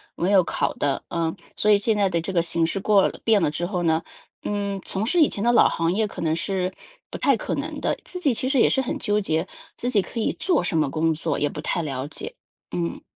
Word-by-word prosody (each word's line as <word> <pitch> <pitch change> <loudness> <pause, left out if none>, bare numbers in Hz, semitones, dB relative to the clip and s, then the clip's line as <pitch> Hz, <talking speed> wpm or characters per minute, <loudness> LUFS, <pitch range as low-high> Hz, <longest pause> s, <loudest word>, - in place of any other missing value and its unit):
没 180 +3 0
有 195 -2 +6
考 - - -1
的， 140 -2 -1
嗯， 165 -1 -1 0.2
所 210 - +1
以 210 - +7
现 215 +2 +1
在 200 -2 +2
的 170 -2 0
这 180 +4 -4
个 170 - +3
形 165 0 +1
势 185 +4 -2
过 200 0 +4
了 - - -7
变 220 -2 +4
了 160 -5 +1
之 170 +3 -2
后 180 -2 -2
呢， 160 -1 +2 0.4
嗯， 200 -1 -2
从 195 +3 -3
事 340 +8 +2
以 305 - +6
前 200 - -4
的 240 - +4
老 240 - +6
行 165 +1 0
业， 215 +2 +1
可 - - -10
能 160 -1 +1
是 185 +1 -2 0.4
不 - - -6
太 - - +3
可 - - -3
能 - - -4
的， - - +1
自 360 - -6
己 290 -8 +2
其 255 +3 -2
实 275 - +1
也 - - +6
是 265 - +2
很 255 - -3
纠 210 -1 0
结， 160 -2 -1 0.3
自 245 - -1
己 210 -5 +4
可 230 - -6
以 220 - 0
做 350 - +2
什 175 - -1
么 155 -3 +2
工 160 +2 +1
作 155 - -2
也 145 - +1
不 150 - -6
太 170 - -1
了 135 -2 -3
解， 150 - -7 0.4
嗯。 85 -1 -3
190 Hz, 285 characters per minute, -24 LUFS, 165-210 Hz, 0.4 s, 以